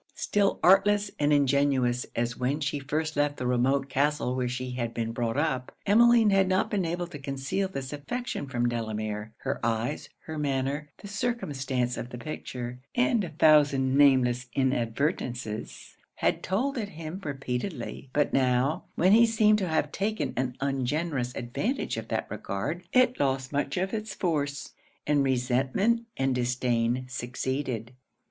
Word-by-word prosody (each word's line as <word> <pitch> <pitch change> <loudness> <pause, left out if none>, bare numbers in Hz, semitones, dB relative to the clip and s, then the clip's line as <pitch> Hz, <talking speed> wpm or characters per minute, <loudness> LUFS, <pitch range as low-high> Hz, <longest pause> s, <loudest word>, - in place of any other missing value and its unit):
Still 205 -1 +1
artless 200 +2 +5
and 145 0 +2
ingenuous 140 -3 +2
as 120 +1 -1
when 130 +4 -1
she 145 -1 -1
first 155 +3 -2
left 145 0 +1
the 125 - -3
remote 130 +3 +2
castle 140 -1 0
where 125 -1 0
she 125 +1 -4
had 120 -2 -3
been 115 -1 -2
brought 115 +1 -2
up, 140 -4 0
Emmeline 230 +1 +6
had 195 -1 +4
not 185 +1 +1
been 195 -4 +1
able 175 +1 -2
to 170 -4 -9
conceal 140 +7 -2
this 135 -7 -6
affection 145 - -4
from 120 -2 0
Delamere. 110 -2 -3
Her - - -3
eyes, 115 +5 -1
her 160 -1 -6
manner, 140 +1 -1
the 205 - -10
circumstance 140 - -2
of 120 - -5
the 125 - -7
picture, 125 -3 -6 0.2
and 245 -3 +3
a 175 - -4
thousand 145 -4 +4
nameless 130 -3 +4
inadvertences, 125 - -2 0.2
had - - 0
told 250 +8 -1
it 205 -3 -3
him 165 +1 -7
repeatedly; 135 -1 -4
but 145 +2 +1
now, 130 +3 +2
when 185 +3 +4
he 230 +2 +7
seemed 215 -1 +4
to 190 - -1
have 155 -2 0
taken 215 +2 -2
an 125 0 -2
ungenerous 135 0 -1
advantage 210 - -2
of 115 0 -5
that 110 - -1
regard, 105 - -3
it 255 -1 +3
lost 135 -1 0
much 140 +2 -1
of 190 +1 -1
it's 215 -2 -4
force, 145 -5 -1 0.3
and 145 -1 +3
resentment 135 - +1
and 135 0 +1
disdain 125 0 0
succeeded. 125 -1 -3
140 Hz, 155 wpm, -28 LUFS, 125-175 Hz, 0.3 s, he